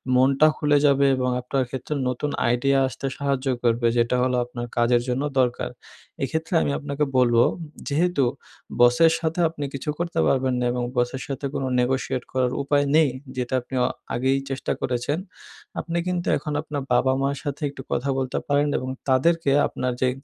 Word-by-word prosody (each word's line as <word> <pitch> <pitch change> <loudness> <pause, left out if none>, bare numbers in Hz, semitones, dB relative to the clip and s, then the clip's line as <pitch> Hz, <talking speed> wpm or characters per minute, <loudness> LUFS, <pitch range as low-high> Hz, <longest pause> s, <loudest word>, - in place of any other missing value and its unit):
মনটা 135 +4 +5
খুলে 145 0 +3
যাবে 140 -1 +4
এবং 125 0 0
আপনার 130 +2 -1
ক্ষেত্রে 130 +3 -4 0.2
নতুন 135 +4 -2 0.2
আইডিয়া 125 +3 +2
আসতে 130 - -7
সাহায্য 140 -1 -1 0.2
করবে। 120 0 +2
যেটা 120 +1 +2
হলো 125 0 +1
আপনার 120 0 -6
কাজের 120 0 +3
জন্য 125 +2 -1 0.2
দরকার। 125 -1 +1 0.5
এক্ষেত্রে 160 +6 -2
আমি - - 0
আপনাকে 140 -1 -5 0.2
বলবো 120 -2 +5 0.4
যেহেতু 155 -1 +2 0.6
বসের 125 +7 +6
সাথে 165 +1 -2
আপনি 150 -3 -5
কিছু 140 +2 -5
করতে 175 - -2
পারবেন 130 -1 +2
না, 125 - 0
এবং 125 0 -2
বসের 120 +2 0
সাথে 140 0 -4
কোনো 135 - -2
নেগোশিয়েট 130 0 0
করার 130 -1 +1
উপায় 145 0 +2
নেই, 155 -2 +5 0.3
যেটা 125 0 -3
আপনি 125 +2 -8
আ - - +2 0.3
আগেই 130 +2 +1
চেষ্টা 135 -1 -3
করেছেন। 125 +4 -1 0.6
আপনি 170 0 -3
কিন্তু 180 -1 -2
এখন, 150 - -5
আপনার 150 -2 -4
বাবা-মা'র 135 +2 +2
সাথে 145 +1 -4
একটু 140 -1 -9
কথা 135 +3 -1
বলতে 130 -1 -2
পারেন 145 +1 +2
এবং 130 - -4 0.2
তাদেরকে 145 +3 +3 0.2
আপনার 125 -1 -2
যে 130 - +3
135 Hz, 170 wpm, -24 LUFS, 125-145 Hz, 0.6 s, বসের